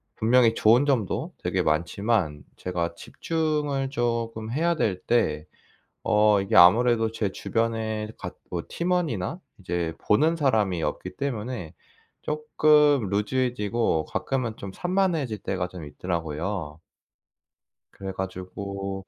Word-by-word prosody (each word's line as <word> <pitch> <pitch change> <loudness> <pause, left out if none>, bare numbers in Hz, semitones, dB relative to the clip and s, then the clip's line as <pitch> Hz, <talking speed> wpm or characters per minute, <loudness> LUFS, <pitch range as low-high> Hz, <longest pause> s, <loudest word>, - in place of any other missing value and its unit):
분명히 115 0 +4
좋은 120 +7 +4
점도 125 -9 0
되게 - - -1
많지만 85 - 0
제가 85 -2 -3
집중을 150 - -2 0.5
금 110 0 -6
해야 170 +6 +1
될 95 - 0
때 75 -11 +1 0.6
어 105 -1 +5
이게 95 - -2
아무래도 115 +5 +6
제 105 -3 -2
주변에 110 -1 -1
같 90 -2 -7
뭐 85 -2 -3
팀원이나 170 - -1 0.2
이제 85 -3 -2
보는 155 +10 +2
사람이 105 - +1
없기 90 0 -4
때문에 120 - -4 0.5
쪼끔 150 -4 +3
loose해지고 110 -4 0
가끔은 125 - -2
좀 100 - -7
산만해질 175 - 0
때가 95 -2 -2
좀 90 -4 -9
있더라고요. 80 +1 -4 1.1
그래 95 -1 -6
가지고 95 +1 -5
110 Hz, 260 characters per minute, -26 LUFS, 90-130 Hz, 1.1 s, 아무래도